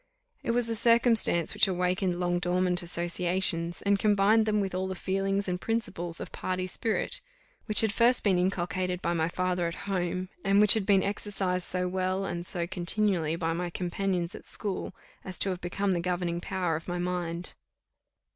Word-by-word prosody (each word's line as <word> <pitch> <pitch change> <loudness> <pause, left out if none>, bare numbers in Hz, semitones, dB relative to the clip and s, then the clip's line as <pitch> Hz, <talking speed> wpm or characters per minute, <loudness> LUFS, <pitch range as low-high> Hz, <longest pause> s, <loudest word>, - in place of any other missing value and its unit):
It - - -5
was 235 0 +2
a 230 - -1
circumstance 230 -7 +3
which - - +4
awakened 180 0 0
long 175 0 +1
dormant 180 0 +1
associations, 175 0 -1
and 200 0 +2
combined 215 +2 +4
them 210 -1 +2
with 195 -2 -2
all 185 +1 -1
the 190 - -4
feelings 195 +2 -1
and 180 0 -2
principles 175 -7 -2
of - - -7
party 185 0 -2
spirit, 215 +4 -2 0.5
which 215 - +4
had 220 -2 +1
first 240 +2 +5
been 190 -4 +3
inculcated 180 0 -1
by 170 - +1
my 165 -1 0
father 180 -1 0
at 170 - -4
home, 185 -1 -2
and 195 +1 +4
which 210 -1 +7
had 215 -4 -1
been 195 -2 +4
exercised 195 -3 -1
so 180 0 0
well 185 +1 -1
and 175 -2 -4
so 175 -2 +1
continually 175 -2 0
by 165 -1 -1
my 175 +1 -2
companions 180 +1 -2
at - - -9
school, 200 -3 -3 0.3
as 185 -1 -4
to 195 - +1
have 180 -1 -3
become 195 +3 -1
the 175 - +1
governing 175 -1 -2
power 180 -3 -1
of 160 - -6
my 175 0 -2
mind. 175 -1 -3
185 Hz, 185 wpm, -28 LUFS, 175-200 Hz, 0.5 s, which